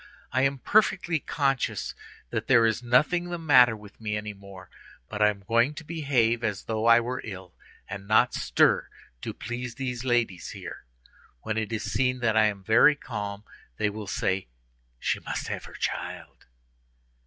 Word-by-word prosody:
I 130 - +2
am 135 +1 +2
perfectly 175 0 +2
conscious 135 -3 -1 0.4
that - - -3
there 120 -3 +6
is 110 0 +1
nothing 150 +9 +2
the 175 - -3
matter 125 -8 +5
with 105 +1 -15
me 105 -1 -2
any 105 0 -5
more; 100 -2 -13 0.4
but 105 - -5
I 105 - +6
am 100 -1 -5
going 115 +8 +2
to 160 - -8
behave 135 -8 +1
as 105 -3 -2
though 110 0 -1
I 115 0 +8
were 125 +2 -3
ill, 95 -4 -8 0.3
and 100 0 -7
not 115 +4 +4
stir, - - +2 0.3
to - - -4
please 120 0 -6
these 125 -2 -4
ladies 120 -9 0
here. - - -9 0.6
When 110 - -2
it 110 0 -2
is 110 -1 -2
seen 125 0 0
that 110 -2 +2
I 110 0 +5
am 100 -2 -4
very 115 +8 +6
calm, 105 -7 -6 0.3
they 105 -1 0
will 105 -1 -7
say, 95 -2 -1 0.5
'She - - -1
must - - -4
have - - -4
her - - -12
child. - - -5
115 Hz, 175 wpm, -27 LUFS, 105-130 Hz, 0.6 s, I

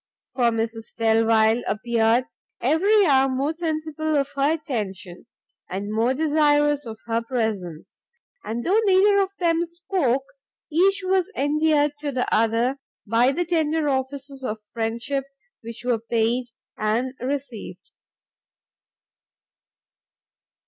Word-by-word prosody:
For 250 -2 +1
Mrs 225 -1 -2
Delvile 225 0 +3
appeared 230 +2 +1 0.3
every 390 - +3
hour 270 -3 +4
more 270 +4 -1
sensible 315 -1 -2
of 280 0 0
her 280 +3 +2
attention, 205 - -6 0.4
and 200 +3 -4
more 230 +4 +1
desirous 295 -2 +2
of 220 -1 -7
her 230 0 0
presence, 220 -9 -4 0.4
and 230 +2 -4
though 410 +5 +3
neither 400 +1 +5
of 385 - 0
them 335 -1 +1
spoke, 335 -7 -1 0.5
each 385 +5 +3
was 375 -1 +1
endeared 295 +2 +2
to 295 -1 -3
the 250 -2 -1
other 230 +4 +2 0.3
by 230 +4 +3
the 350 +5 -1
tender 315 -2 +1
offices 270 0 -3
of 220 -4 -3 0.2
friendship 235 +4 -2 0.4
which 230 +1 -8
were 245 -2 +1
paid 230 +2 0 0.3
and 230 +5 0
received. 255 -3 -5
265 Hz, 115 wpm, -23 LUFS, 230-310 Hz, 0.5 s, neither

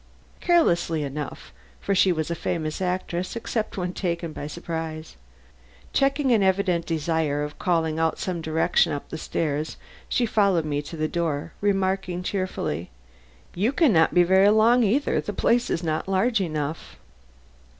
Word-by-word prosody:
Carelessly 170 - +2
enough, 145 - -6 0.3
for - - -1
she 190 -1 +4
was 160 -1 -2
a - - +1
famous 155 0 -3
actress 180 0 -2
except 225 -2 -3
when 180 -1 -2
taken 170 -4 -3
by 145 - -6
surprise. 160 -1 -6 0.8
Checking 275 0 +2
an 225 -3 +4
evident 190 -3 +1
desire 160 -2 0
of 150 0 -7
calling 160 -3 0
out 165 0 +1
some 180 -3 -3
direction 160 0 +2
up 145 +2 -6
stairs, 155 -1 -2 0.3
she 245 - +2
followed 200 -7 +2
me 145 -1 -1
to 155 +3 -9
the 155 0 0
door, 165 -1 -2
remarking 190 -2 0
cheerfully, 180 - -3 0.6
"You 210 +8 +1
can 285 -5 +3
not 160 -1 +4
be 175 - +5
very 190 +3 +5
long 225 +3 +5
either; 245 +8 +1
the - - -5
place 240 +1 +2
is 170 - -1
not 155 +1 -2
large 200 +4 +2
enough." 155 -3 -4
175 Hz, 150 wpm, -25 LUFS, 155-195 Hz, 0.8 s, be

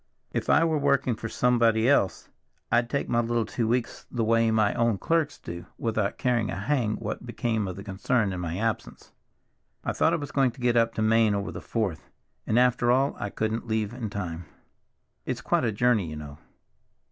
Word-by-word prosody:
If - - -3
I - - +5
were 160 -2 +1
working 140 -3 +2
for 115 +1 -6
somebody 115 -2 +3
else 130 -9 +2 0.4
I'd 120 0 +3
take 140 - -1
my 120 - +1
little 120 -1 0
two 115 +1 -2
weeks 120 +1 -2
the 120 -2 -1
way 115 0 +3
my 110 -2 +2
own 115 -3 +1
clerks 160 - 0
do, 85 0 -8
without 110 -3 -1
caring 120 -4 +1
a - - -3
hang 110 +1 0
what - - -5
became 110 -3 -1
of 90 - -5
the 100 - -8
concern 100 +1 0
in 90 - -4
my 85 0 -3
absence. 115 +1 -3 0.7
I - - -1
thought - - +2
I - - +4
was 145 -3 -5
going 135 -4 +2
to 130 - -16
get 120 -1 +2
up 115 -1 +2
to 110 - 0
Maine 110 -1 +4
over 100 0 -3
the - - -7
Fourth, 100 -9 -3 0.4
and 110 - +2
after 125 -1 +3
all 135 +3 +2
I 100 - -3
couldn't 110 +3 -2
leave 110 -1 -1
in 120 -3 -4
time. 90 -4 -5 0.8
It's - - -2
quite - - +1
a 115 - +1
journey, 110 -3 +2
you 75 - -6
know. 75 -1 -9
115 Hz, 205 wpm, -27 LUFS, 105-125 Hz, 0.8 s, I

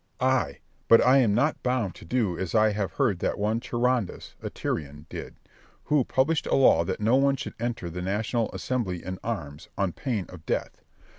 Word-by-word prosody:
Berg. 130 - +1
Ay, 125 - +1 0.3
but 115 - +8
I 130 +2 +6
am 110 -6 +3
not 140 +7 +1
bound 125 -7 0
to - - -13
do 110 -8 0
as 95 +2 -3
I 110 0 +5
have 100 -2 -2
heard 120 -11 +1
that - - -1
one 105 +2 0
Charondas, 120 -3 -1
a - - -4
Tyrian, 75 0 -4
did, - - -7 0.5
who 150 -3 +2
published 150 +4 +1
a - - +2
law 130 -10 +5
that - - -3
no 110 +4 +3
one 140 0 +3
should 135 - -6
enter 120 -6 -3
the 90 +2 -5
national 110 +4 -1
assembly 105 -9 -3
in 95 0 -5
arms, 80 -10 -5
on 100 -2 +1
pain 115 -9 -2
of 90 -3 -11
death. - - -2
110 Hz, 200 wpm, -27 LUFS, 95-130 Hz, 0.5 s, but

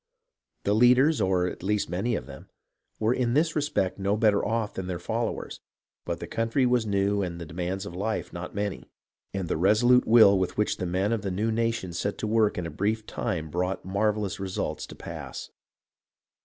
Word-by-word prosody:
The 100 - +2
leaders, 125 +7 +5
or 95 -1 +2
at 90 - -5
least 105 +2 0
many 100 +8 -1
of 65 - -4
them, 70 +7 -12 0.5
were 110 +2 +2
in 125 -1 0
this 160 +2 +2
respect 145 -11 0
no 100 +2 +1
better 105 -2 +3
off 110 -1 -1
than 95 -1 -5
their 90 -1 -3
followers; 115 +6 -3 0.5
but - - -3
the - - -5
country 115 +4 0
was 120 -3 +2
new 100 0 +1
and 85 -3 -4
the 85 - -6
demands 90 +5 -4
of 100 - -7
life 110 +4 -3
not 85 +2 -7
many, 100 -1 -3 0.4
and 95 -2 -3
the - - -1
resolute 115 +8 +4
will 110 -4 +7
with 95 -1 -2
which 105 - +1
the 90 - -3
men 95 +5 0
of 115 - -1
the 100 - -3
new 105 +5 0
nation 115 -5 -1
set 100 +4 -2
to - - -3
work 110 -1 +2
in 90 - -2
a 85 - -5
brief 110 +2 -1
time 80 -7 -3
brought 90 +3 -2
marvellous 100 0 0
results 95 -1 -3
to - - -10
pass. - - -8
100 Hz, 195 wpm, -27 LUFS, 95-115 Hz, 0.5 s, will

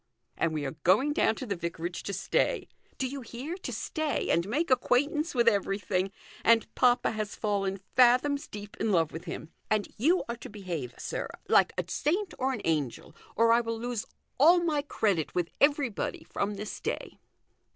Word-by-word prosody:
And 165 - +1
we 155 -2 -2
are 135 - -5
going 225 +12 +4
down 220 -6 +2
to 260 - -6
the 200 -4 -2
vicarage 170 0 -4
to - - -4
stay; 195 0 0 0.3
do 265 - -1
you 275 +1 -6
hear, 255 +8 -6
to 385 - -6
stay, 310 -2 -1
and 170 +3 +1
make 305 +6 0
acquaintance 290 +5 +2
with 235 -1 +3
everything. 195 -3 +1 0.3
And 230 0 +5
papa 250 -1 +3
has 215 -2 -4
fallen 195 -2 -1 0.2
fathoms 255 +3 +4
deep 205 0 -9
in 220 - 0
love 165 -4 +2
with 165 +2 -7
him. 165 -1 -6 0.2
And 215 -1 0
you 335 +10 +3
are 235 0 -4
to - - -9
behave, 175 - -5
sir, - - -3 0.2
like - - +5
a - - +1
saint 370 +6 -1
or 265 +1 +1
an 240 -5 -4
angel, 150 -6 -1 0.2
or 230 +1 +4
I 235 +1 +5
will 230 -1 -3
lose 235 -1 -3 0.3
all 335 +6 +7
my 305 -4 +1
credit 200 - 0
with 175 -2 0
everybody 285 -6 +1
from 205 +1 -2
this 210 +1 -6
day." - - -4
225 Hz, 180 wpm, -29 LUFS, 195-270 Hz, 0.3 s, all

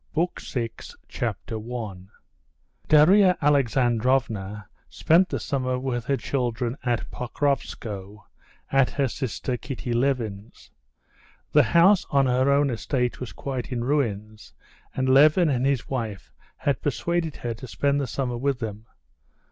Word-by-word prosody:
PART 170 +3 -1
SIX 115 -3 -5
Chapter 110 - -4
1 105 -5 -7 0.8
Darya 180 +5 +6
Alexandrovna 120 -6 +1 0.2
spent 175 +4 +3
the - - -2
summer 130 -2 -1
with 125 -2 -3
her 140 +1 +1
children 120 -3 -2
at 120 -2 -1
Pokrovskoe, 105 -6 -3 0.5
at 135 -1 +4
her 140 -2 0
sister 125 -1 -3
Kitty 125 -2 -5
Levin's. 115 -5 -2 0.8
The 150 - +6 0.2
house 190 +3 +5
on 140 -2 +3
her 130 +1 +2
own 140 -1 +3
estate 125 +1 -2
was 125 - -6
quite 130 -2 -5
in 120 -2 -2
ruins, 110 -6 -2 0.4
and 130 0 0
Levin 150 +6 +5
and 130 -1 +1
his 140 -4 0
wife 115 -7 -4 0.3
had 140 - -1
persuaded 165 +3 -1
her 120 -1 -4
to 120 +3 -10
spend 140 +4 0
the 135 - -2
summer 125 -1 -2
with 135 +1 0
them. 110 -2 -6
130 Hz, 130 wpm, -25 LUFS, 115-140 Hz, 0.8 s, Darya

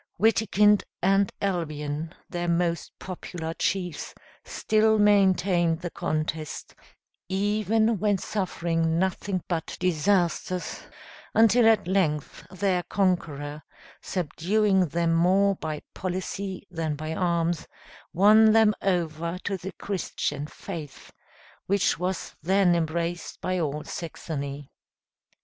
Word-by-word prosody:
Witikind 210 -1 +4 0.2
and 195 +1 +3
Albion, 155 -3 -2
their 175 -1 -3
most 170 0 0
popular 170 -3 -6
chiefs, 180 -3 -2 0.3
still 220 0 +2
maintained 190 -5 +3
the 175 -2 -4
contest, 155 0 -3 0.6
even 215 +2 +1
when 205 0 +2
suffering 170 -5 -1
nothing 190 0 -1
but 165 -3 -3
disasters, 180 +1 0 0.5
until 225 +1 +6
at 220 -5 +4
length, 155 -7 0
their 185 -1 0
conqueror, 155 -7 -1 0.4
subduing 190 +3 +1
them 165 +2 0
more 190 +4 +4
by 155 -2 -5
policy 190 +1 -4
than 160 -3 -2
by 155 +2 -4
arms, 170 -1 0 0.4
won 215 +4 +6
them 220 -1 +5
over 170 -2 -1
to 200 - -1
the 190 +1 -6
Christian 150 -6 -3
faith, 155 -5 -9 0.6
which 200 0 +2
was 180 0 -3
then 190 +2 +3
embraced 170 +1 -2
by 185 0 -1
all 150 -2 -2
Saxony. 145 -4 -6
180 Hz, 105 wpm, -26 LUFS, 165-195 Hz, 0.6 s, until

